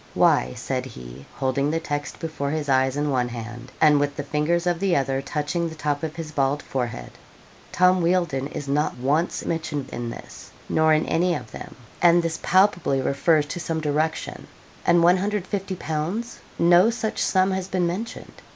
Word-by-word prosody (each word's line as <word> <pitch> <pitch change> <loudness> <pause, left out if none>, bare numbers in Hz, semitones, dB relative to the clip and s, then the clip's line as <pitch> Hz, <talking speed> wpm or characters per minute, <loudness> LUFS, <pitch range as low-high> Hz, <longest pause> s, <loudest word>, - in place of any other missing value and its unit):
'Why,' 60 +1 +3
said - - -3
he, 65 +2 -11
holding 135 +2 0
the 165 +2 0
text 145 -3 -4
before 155 -4 -3
his 150 0 -2
eyes 130 0 +2
in 145 0 0
one 125 -2 0
hand 120 +1 -8
and 150 -2 +5
with 145 0 -1
the 145 - -4
fingers 150 +4 0
of 175 -2 +1
the 195 -2 +2
other 135 -1 0
touching 155 +4 -2
the 160 - -9
top 145 -2 -2
of 160 -1 -4
his 165 -2 -6
bald 140 0 0
forehead, 120 - -4 0.6
'Tom 185 0 +4
Wealdon 170 -6 +1
is 145 -1 -6
not 145 0 0
once 145 +7 0
mentioned 155 -4 -3
in 120 0 -4
this, - - -10 0.2
nor 160 0 +3
in 155 0 +3
any 175 +2 +1
of 125 -6 -7
them; - - -9 0.3
and 175 0 +5
this 165 0 -2
palpably 180 -7 +3
refers 150 +3 +2
to 160 +4 -5
some 165 -1 -2
direction. 155 +1 -2 0.4
And 170 0 +5
150_l._? 190 +1 -1 0.2
no 175 +5 +5
such 225 -2 -2
sum 190 0 +2
has 190 -1 -2
been 185 -2 0
mentioned. 190 +7 -5
155 Hz, 175 wpm, -24 LUFS, 140-175 Hz, 0.6 s, and